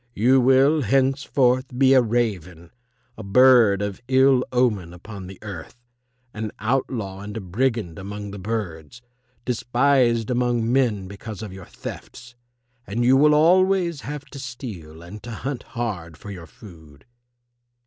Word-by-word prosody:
You 130 +5 +4
will 135 +4 +4
henceforth 130 0 +1
be 135 0 +5
a 130 - +6
raven, 95 -8 -2 0.5
a - - -5
bird 110 -1 +5
of 100 +2 -5
ill 130 0 +4
omen 105 -9 0
upon 95 +1 -10
the 95 0 -10
earth, 100 +1 -8 0.6
an 110 -1 -5
outlaw 110 -4 -2
and 105 +2 -7
a - - -2
brigand 105 -2 -2
among 105 +1 -7
the 100 - -8
birds, 105 0 -5 0.4
despised 120 -1 +1
among 120 -1 0
men 115 -8 +1
because 105 +2 -8
of 105 -3 -7
your 95 -2 -10
thefts. 125 0 -10 0.5
And 115 +5 -1
you 130 +2 +5
will 150 +2 +5
always 175 0 +3
have 145 -1 -7
to 140 - -9
steal 100 - -8
and 100 +5 -10
to 120 - -9
hunt 130 +3 -5 0.2
hard 90 -9 -4
for 105 - -10
your 90 -4 -9
food." 80 - -16
115 Hz, 145 wpm, -23 LUFS, 100-130 Hz, 0.6 s, a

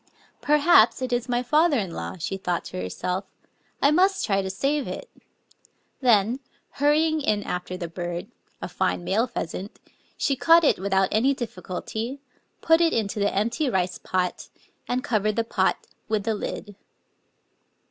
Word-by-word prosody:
" - - -32
Perhaps 300 +5 +5
it 255 -1 -2
is 245 +1 -1
mjrjfather 285 +6 +2
in 195 -8 -1
law/' 175 - -6
she 180 - -3
thought 180 -2 -2
to 90 - -5
herself; 180 - -3 0.3
— - - -40
"I 285 - +6
must 380 +4 +3
try 195 -2 +1
to 190 - -4
save 275 +9 -1
it!" - - -7 0.9
Then, 235 -1 +3 0.4
hurrying 310 +2 +3
in 210 -6 0
after 180 0 -4
the 175 -2 -4
bird, 175 +4 -5
— - - -40
a - - -2
fine - - -1
male 220 +7 +1
pheasant, 195 -3 -6 0.2
— - - -37
she 275 - +1
caught 330 +5 +5
it 290 - +3
without 190 0 +1
any 260 +6 +3
difficulty, 225 +3 -5 0.4
put 325 +1 +4
it 335 -1 +3
into 210 -2 -1
the 200 0 +2
empty 235 +8 0
rice 185 -4 -1
pot, 180 -1 -2 0.4
and 250 +1 -1
covered 215 -5 0
the 230 - +1
pot 225 - 0 0.2
with 215 -2 0
the 225 +1 0
lid. 205 0 -5
220 Hz, 170 wpm, -25 LUFS, 190-280 Hz, 0.9 s, I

